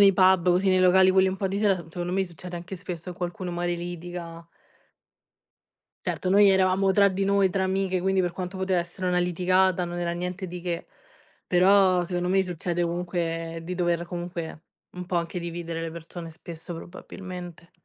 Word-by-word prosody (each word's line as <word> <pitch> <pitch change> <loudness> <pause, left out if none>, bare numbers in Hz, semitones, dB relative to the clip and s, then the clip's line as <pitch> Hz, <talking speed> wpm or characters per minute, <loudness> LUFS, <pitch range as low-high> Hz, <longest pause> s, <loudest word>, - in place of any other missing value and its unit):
nei 195 -1 +8
pub, 185 -1 +5
così, 185 +2 +3
nei 185 0 +4
locali 185 +1 +6
quelli 190 0 +4
un 190 - -2
po' 195 0 -1
di 195 +1 -2
sera, 205 -2 +3
s - - -7
secondo 175 +1 -4
me 190 0 +1
succede 175 0 -9
anche 175 +2 -6
spesso 180 0 -7
che 175 - -9
qualcuno 180 +1 -4
magari 175 0 -1
litiga. 170 -1 -7 1.6
Certo, 185 - -1
noi 200 +1 +7
eravamo 190 0 +3
tra 200 0 +5
di 195 +1 -1
noi, 200 -1 +3
tra 190 +1 0
amiche, 190 -1 0
quindi 190 +1 +2
per 175 -1 -1
quanto 185 +1 -5
poteva 190 -1 +1
essere 180 +2 -5
una 180 0 +2
litigata, 180 +1 +2
non 175 0 -5
era 170 -1 -1
niente 180 +2 -4
di 180 +1 -6
che. 175 -2 -3 0.6
Però 185 0 +5
secondo 180 0 -2
me 190 +1 +3
succede 175 -1 -2
comunque 170 -1 -2
di 180 +2 -4
dover 175 -1 0
comunque 175 -2 -6 0.3
un 180 0 -6
po' 180 0 -2
anche 170 +1 -2
dividere 170 -1 -4
le 165 - -3
persone 165 0 -8
spesso, 165 +1 -9
probabilmente. 180 0 -9
180 Hz, 190 wpm, -26 LUFS, 175-190 Hz, 1.6 s, nei